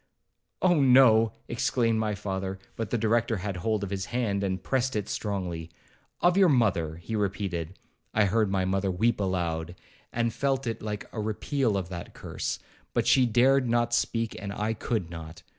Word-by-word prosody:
'Oh 175 Hz, -5 st, +4 dB
no!' 125 Hz, -4 st, +6 dB, 0.2 s
exclaimed 115 Hz, -1 st, +1 dB
my 105 Hz, -1 st, 0 dB
father; 95 Hz, -1 st, -3 dB, 0.2 s
but 115 Hz, -2 st, -3 dB
the 120 Hz, -, 0 dB
Director 115 Hz, 0 st, +1 dB
had 95 Hz, 0 st, -4 dB
hold 105 Hz, +3 st, -1 dB
of 100 Hz, -, -4 dB
his 95 Hz, -1 st, -2 dB
hand, 105 Hz, -5 st, -1 dB
and 95 Hz, -2 st, -2 dB
pressed 130 Hz, -1 st, 0 dB
it 105 Hz, -2 st, -1 dB
strongly. 90 Hz, -6 st, -3 dB, 0.5 s
'Of 175 Hz, 0 st, +4 dB
your 190 Hz, -2 st, +6 dB
mother,' 95 Hz, -, +2 dB
he 85 Hz, +7 st, -5 dB
repeated. 95 Hz, -4 st, -2 dB, 0.3 s
I 110 Hz, -1 st, +3 dB
heard 105 Hz, +1 st, +2 dB
my 95 Hz, -1 st, +1 dB
mother 95 Hz, +1 st, 0 dB
weep 110 Hz, +6 st, +1 dB
aloud, 85 Hz, -3 st, -1 dB, 0.4 s
and 115 Hz, -1 st, 0 dB
felt 135 Hz, 0 st, 0 dB
it 115 Hz, -2 st, -3 dB
like 105 Hz, -1 st, -4 dB
a 110 Hz, -, -3 dB
repeal 110 Hz, +1 st, 0 dB
of 90 Hz, -3 st, -3 dB
that 90 Hz, -2 st, -7 dB
curse; -, -, -4 dB, 0.4 s
but -, -, +2 dB
she 130 Hz, -2 st, +5 dB
dared 125 Hz, +2 st, +4 dB
not 120 Hz, 0 st, +1 dB
speak, 115 Hz, -1 st, 0 dB
and 100 Hz, -1 st, -4 dB
I 105 Hz, +2 st, -1 dB
could 105 Hz, -5 st, -2 dB
not. 80 Hz, 0 st, -9 dB
105 Hz, 175 wpm, -28 LUFS, 95-120 Hz, 0.5 s, no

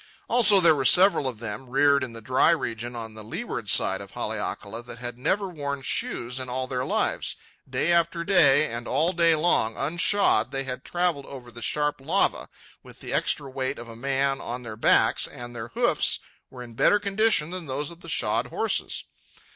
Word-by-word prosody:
Also, 215 Hz, -5 st, +5 dB
there 170 Hz, -3 st, +6 dB
were 140 Hz, -3 st, -1 dB
several 180 Hz, -1 st, +5 dB
of 125 Hz, -4 st, -4 dB
them, 110 Hz, +3 st, -7 dB
reared 140 Hz, +1 st, +3 dB
in 130 Hz, -, -5 dB
the 115 Hz, -, -10 dB
dry 130 Hz, +4 st, +3 dB
region 120 Hz, -7 st, -2 dB
on 110 Hz, -2 st, -7 dB
the 110 Hz, 0 st, -10 dB
leeward 120 Hz, -, -5 dB
side -, -, +3 dB
of -, -, -10 dB
Haleakala, 110 Hz, +3 st, -4 dB
that 120 Hz, 0 st, -10 dB
had 120 Hz, 0 st, -6 dB
never 190 Hz, +11 st, 0 dB
worn 140 Hz, -5 st, -5 dB
shoes 125 Hz, 0 st, -2 dB
in 130 Hz, -1 st, -5 dB
all 130 Hz, +1 st, -2 dB
their 130 Hz, -1 st, -3 dB
lives. -, -, -1 dB, 0.3 s
Day 130 Hz, +6 st, 0 dB
after 170 Hz, 0 st, +1 dB
day, 160 Hz, -6 st, +5 dB
and 120 Hz, +1 st, -6 dB
all 165 Hz, +4 st, +1 dB
day 165 Hz, -1 st, +4 dB
long, 150 Hz, -8 st, +1 dB
unshod, 160 Hz, -, +2 dB
they 135 Hz, 0 st, -2 dB
had 125 Hz, -1 st, -6 dB
travelled 175 Hz, -5 st, -1 dB
over 125 Hz, -3 st, -10 dB
the 120 Hz, -, -11 dB
sharp 150 Hz, +2 st, -1 dB
lava, 135 Hz, -, 0 dB, 0.3 s
with -, -, -15 dB
the -, -, -6 dB
extra 140 Hz, -, 0 dB
weight 130 Hz, 0 st, -3 dB
of 120 Hz, -, -9 dB
a 115 Hz, -, -10 dB
man 135 Hz, +2 st, -1 dB
on 125 Hz, +1 st, -5 dB
their 110 Hz, -2 st, -7 dB
backs, 110 Hz, +2 st, +3 dB
and 120 Hz, -3 st, -9 dB
their 115 Hz, -1 st, -6 dB
hoofs -, -, +1 dB, 0.3 s
were 125 Hz, -1 st, -9 dB
in 120 Hz, -1 st, -12 dB
better 205 Hz, -, +3 dB
condition 200 Hz, -5 st, +1 dB
than 180 Hz, -3 st, -6 dB
those 140 Hz, +4 st, -3 dB
of 170 Hz, -, -13 dB
the 170 Hz, -, -10 dB
shod -, -, 0 dB
horses. -, -, -2 dB
135 Hz, 195 wpm, -25 LUFS, 120-170 Hz, 0.3 s, there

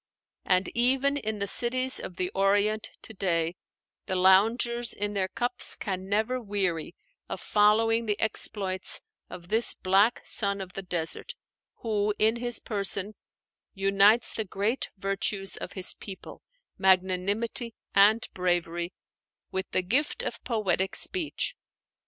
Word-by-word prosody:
And 185 Hz, 0 st, +2 dB
even 265 Hz, +4 st, +2 dB
in 220 Hz, -6 st, -3 dB
the 200 Hz, -, -2 dB
cities 255 Hz, +5 st, +2 dB
of 180 Hz, -, -8 dB
the 180 Hz, +1 st, -2 dB
Orient 205 Hz, +2 st, +1 dB
to 220 Hz, -, -10 dB
day, 170 Hz, -4 st, 0 dB, 0.5 s
the 190 Hz, -, -1 dB
loungers 225 Hz, +6 st, +3 dB
in 205 Hz, +1 st, -3 dB
their 195 Hz, -2 st, 0 dB
cups 245 Hz, +4 st, 0 dB
can 190 Hz, -2 st, -4 dB
never 220 Hz, +5 st, 0 dB
weary 195 Hz, -7 st, -2 dB, 0.3 s
of -, -, -4 dB
following 225 Hz, +2 st, +3 dB
the 210 Hz, -1 st, -1 dB
exploits 195 Hz, -3 st, 0 dB, 0.3 s
of 175 Hz, -1 st, -10 dB
this 225 Hz, +2 st, +1 dB
black 200 Hz, +5 st, +3 dB
son 200 Hz, -2 st, 0 dB
of 185 Hz, -1 st, -7 dB
the 195 Hz, -, -5 dB
desert, 175 Hz, -3 st, -4 dB, 0.5 s
who 210 Hz, -2 st, 0 dB
in 220 Hz, +2 st, +3 dB
his 240 Hz, 0 st, -1 dB
person 200 Hz, -1 st, -3 dB, 0.6 s
unites 200 Hz, +3 st, +4 dB
the 220 Hz, -, -2 dB
great 205 Hz, +6 st, -1 dB
virtues 195 Hz, 0 st, -1 dB
of -, -, -7 dB
his 185 Hz, -2 st, +1 dB
people, 195 Hz, -2 st, -10 dB, 0.4 s
magnanimity 190 Hz, +5 st, +1 dB, 0.2 s
and 210 Hz, +3 st, +5 dB
bravery, 175 Hz, -1 st, -1 dB, 0.6 s
with 190 Hz, 0 st, -3 dB
the 185 Hz, -, 0 dB
gift 260 Hz, +11 st, 0 dB
of 235 Hz, -, -5 dB
poetic 195 Hz, -5 st, 0 dB
speech. 360 Hz, -5 st, -1 dB
200 Hz, 135 wpm, -27 LUFS, 190-225 Hz, 0.6 s, and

